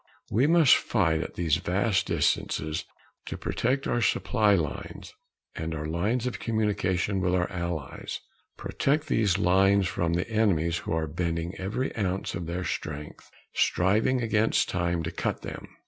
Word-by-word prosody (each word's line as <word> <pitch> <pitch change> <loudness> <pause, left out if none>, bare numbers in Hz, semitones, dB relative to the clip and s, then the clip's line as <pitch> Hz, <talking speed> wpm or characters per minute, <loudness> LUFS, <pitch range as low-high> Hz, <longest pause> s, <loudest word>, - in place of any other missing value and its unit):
We 125 +7 +3
must 165 -4 +6
fight 85 -8 +1
at - - -6
these 80 -3 +1
vast 95 +3 0
distances 75 +1 0 0.4
to - - -4
protect 135 +3 -1
our 120 - +1
supply 105 -2 +3
lines 80 -6 -4 0.4
and 80 0 -3
our 75 0 -4
lines 100 +10 0
of 125 - -3
communication 100 -3 0
with 90 0 +1
our 90 0 +1
allies 85 -6 -4 0.4
protect 150 +3 0
these 105 - +2
lines 95 0 +4
from 85 -1 -1
the 85 +2 0
enemies 95 -7 +1
who - - -6
are 80 0 0
bending 85 +2 -2
every 105 +8 -2
ounce 95 -3 -2
of 85 -1 -4
their 90 +2 -3
strength, 75 -3 -5 0.2
striving 110 +7 +2
against 110 -1 +2
time, 85 -2 0
to 85 - -3
cut 85 - -3
them. - - -7
95 Hz, 150 wpm, -27 LUFS, 85-110 Hz, 0.4 s, must